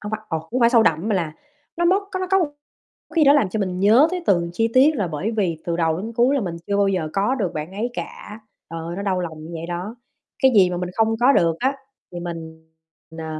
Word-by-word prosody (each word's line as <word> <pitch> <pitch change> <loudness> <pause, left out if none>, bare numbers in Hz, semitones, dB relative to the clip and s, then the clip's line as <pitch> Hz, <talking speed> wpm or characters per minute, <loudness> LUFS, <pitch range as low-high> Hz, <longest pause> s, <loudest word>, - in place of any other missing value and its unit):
hông 210 - -6
phải 215 - -3
ồ, 160 - -1
hông 255 - 0
phải 235 0 +5
sâu 235 -3 +5
đậm 165 0 +1
mà 215 - +1
là 165 -5 -2 0.4
nó 345 - 0
móc 385 +4 +3
có 375 - -2
có 385 - +4
một 350 - +2 0.7
khi 325 -3 +4
đó 280 - +7
làm 285 -9 +3
cho 215 +4 -3
mình 185 -2 -2
nhớ 225 +10 +5
tới 365 -1 -3
từng 170 -3 +2
chi 225 +5 +1
tiết, 285 +4 +5
là 200 -7 -1
bởi 170 +7 -3
vì 175 -7 0
từ 170 -1 -2
đầu 165 -1 +1
đến 220 +5 -5
cuối 245 +4 +3
là 280 - +1
mình 175 -6 -4
chưa 200 - 0
bao 200 0 +3
giờ 180 -5 -1
có 205 +6 +1
được 200 -10 -2
bạn 155 +4 -5
ấy 220 +5 -3
cả, 210 -2 -8 0.3
trời 165 - -5
ơi, 170 +1 -5
nó 200 - -4
đau 190 -2 0
lòng 160 -3 -6
như 160 - -9
vậy 165 0 -5
đó. 180 +6 -5 0.5
Cái 265 -1 +5
gì 185 -3 +6
mà 180 - -3
mình 180 0 -3
không 225 0 +2
có 255 +3 +6
được 165 -10 +2
á, 265 +2 0 0.4
thì 175 - -6
mình, 160 -2 -8 0.5
ờ, 160 - -5
200 Hz, 270 wpm, -22 LUFS, 170-240 Hz, 0.7 s, đó